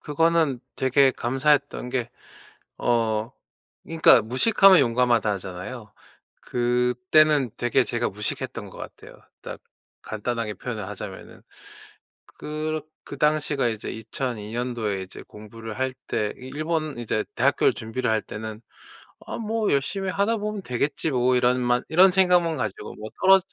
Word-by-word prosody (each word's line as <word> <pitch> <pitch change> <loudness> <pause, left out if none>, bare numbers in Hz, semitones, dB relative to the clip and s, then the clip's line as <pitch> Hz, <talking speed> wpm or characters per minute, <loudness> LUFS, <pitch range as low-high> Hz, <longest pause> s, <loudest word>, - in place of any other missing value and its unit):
그거는 160 -3 +1 0.2
되게 130 +1 +4
감사했던 135 +1 0
게 125 -2 -2 0.7
어 115 -2 0 0.5
그니까 160 -7 +5
"무식하면 185 - +5
용감하다." 120 -4 +2
하잖아요. 100 +4 -7 0.5
그때는 125 +3 +2
되게 120 -1 +2
제가 120 0 -1
무식했던 105 +1 -5
것 - - -13
같아요. - - -10 0.3
딱 - - -8 0.4
간단하게 110 -1 -3
표현을 110 -5 -5
하자면은. 105 -1 -9 0.8
그렇 155 +1 -5 0.2
그 140 - -9
당시가 150 -3 +1
이제 110 -2 -3
2002 110 -1 -5
년도에 115 -5 -2
이제 95 - -10
공부를 110 +1 -10
할 130 0 -1
때 105 -1 -1
이 130 +1 -10
일본 155 -2 -2
이제 110 -2 -1
대학교를 - - +3
준비를 115 +2 -3
할 110 -1 +1
때는 110 0 -7 0.7
'아 - - -4
뭐 220 -1 -1
열심히 185 +8 -1
하다 205 +4 +1
보면 210 -1 -4
되겠지 140 +3 -1
뭐.' 125 0 +2
이런 125 +1 +3
만 120 0 +1
이런 185 +4 +6
생각만 180 -3 +3
가지고 105 0 -4
뭐 110 +1 -8
떨어 190 0 +7
125 Hz, 290 characters per minute, -24 LUFS, 110-155 Hz, 0.8 s, 떨어